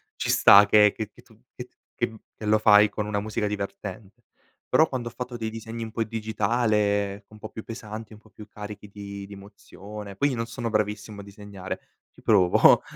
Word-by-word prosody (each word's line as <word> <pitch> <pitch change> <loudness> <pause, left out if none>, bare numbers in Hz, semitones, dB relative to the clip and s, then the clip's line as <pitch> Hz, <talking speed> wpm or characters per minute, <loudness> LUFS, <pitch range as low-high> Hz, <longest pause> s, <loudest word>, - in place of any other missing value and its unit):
ci - - -3
sta, 100 +1 +8
che 105 0 +6
che 110 - -4 0.2
tu 110 - -21 0.2
che 125 - -6
t - - -43 0.2
che 120 - 0
m 110 - -12 0.2
che 110 - -7
lo 110 +1 +3
fai 105 0 +6
con 105 0 -4
una 105 -1 -1
musica 105 0 -2
divertente, 100 +2 -6 0.4
però 160 - +5
quando 125 -4 -4
ho - - -16
fatto 125 0 -6
dei 110 -1 -3
disegni 115 +1 -6
un 110 - -7
po' 115 - -1
digitale, 105 -2 0
un 110 - -15
po' 110 0 -8
più 110 - -8
pesanti, 110 -1 -8
un 105 - -14
po' 110 - -22
più 105 -1 -13
carichi 105 0 -9
di 100 -1 -8
di 100 - -11
emozione 100 0 -10
poi 140 +8 +2
io 130 - -2
non 115 0 -2
sono 115 0 -4
bravissimo 105 -1 -2
a - - -11
disegnare, 100 -2 -8 0.3
ci - - -20
provo, 95 -5 +5
105 Hz, 210 wpm, -25 LUFS, 100-110 Hz, 0.4 s, sta